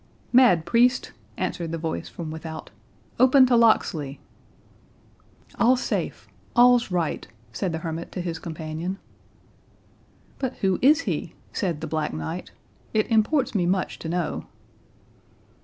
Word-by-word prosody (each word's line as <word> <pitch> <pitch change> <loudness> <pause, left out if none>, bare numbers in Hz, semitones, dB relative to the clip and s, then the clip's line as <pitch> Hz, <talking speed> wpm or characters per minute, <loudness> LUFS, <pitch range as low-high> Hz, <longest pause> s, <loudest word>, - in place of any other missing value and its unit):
"Mad 240 -11 +6
priest," 245 +2 +3 0.3
answered 170 -2 -3
the 165 - -2
voice 160 0 -4
from 160 -3 -6
without, 160 0 -7 0.5
"open 260 +1 +7
to 250 -1 +3
Locksley!" 165 -11 +2 1.4
"All's 250 +2 +4
safe—all's 245 -1 +1
right," 175 -4 -1 0.3
said 185 +6 -2
the 160 - -2
hermit 165 +1 -4
to 180 - -3
his 170 -2 -4
companion. 160 +3 -5 1.4
"But 260 -2 -2
who 190 -2 0
is 300 +5 +5
he?" - - -3 0.2
said 170 -7 -2
the - - -3
Black 155 - -2
Knight; 80 0 -5 0.5
"it 215 +2 +1
imports 230 +6 +2
me 180 -5 +1
much 185 +1 -1
to 160 - -5
know." 175 -1 -2
180 Hz, 125 wpm, -25 LUFS, 160-240 Hz, 1.4 s, open